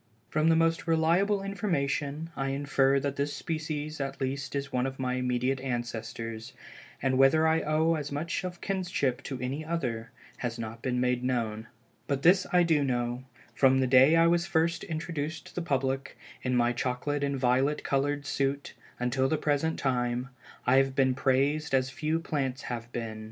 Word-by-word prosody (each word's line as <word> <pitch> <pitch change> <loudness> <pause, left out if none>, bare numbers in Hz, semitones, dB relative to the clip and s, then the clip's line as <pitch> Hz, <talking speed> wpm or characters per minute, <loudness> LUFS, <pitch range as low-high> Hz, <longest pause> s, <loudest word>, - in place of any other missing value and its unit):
From 155 +1 +2
the 165 - +5
most 165 +1 +1
reliable 175 +5 +2
information, 160 -6 -2
I 135 - -2
infer 140 0 +2
that 140 0 -3
this 145 +1 -1
species 155 -2 -4
at 135 0 -4
least 135 +1 -3
is 140 -1 -3
one 125 +1 +1
of 135 0 -6
my 130 -1 -1
immediate 125 +1 0
ancestors, 115 -3 -4 0.5
and 130 -1 +2
whether 155 +4 +5
I 160 0 +3
owe 155 +2 +2
as 150 -3 -3
much 160 +6 -2
of 180 -1 -6
kinship 180 -10 -1
to 135 -2 -4
any 130 +5 -3
other, 125 -9 -3 0.3
has 120 -1 -3
not 115 0 -6
been 125 -1 -1
made 125 0 +1
known. 115 -3 -1 0.4
But 140 -1 -1
this 185 +2 +5
I 180 -1 +5
do 160 -4 +3
know, 120 -1 -1 0.3
from 135 -1 +4
the 130 - +3
day 130 +4 +6
I 165 0 +5
was 170 0 +2
first 165 +1 +1
introduced 160 -1 -4
to - - -13
the 180 - -3
public, 135 -4 -1 0.2
in 125 0 0
my 120 0 +3
chocolate 130 +4 -2
and 140 -1 0
violet 130 +3 +2
colored 145 +1 0
suit 140 0 -1 0.3
until 130 +2 +1
the 155 - +1
present 150 +2 0
time, 125 -1 -1 0.4
I 125 +2 +5
have 135 0 +2
been 130 -1 +3
praised 135 +3 +1
as 130 0 +1
few 155 +3 -1
plants 140 -5 -2
have 120 -1 -5
been. 115 -3 -4
135 Hz, 180 wpm, -29 LUFS, 125-155 Hz, 0.5 s, day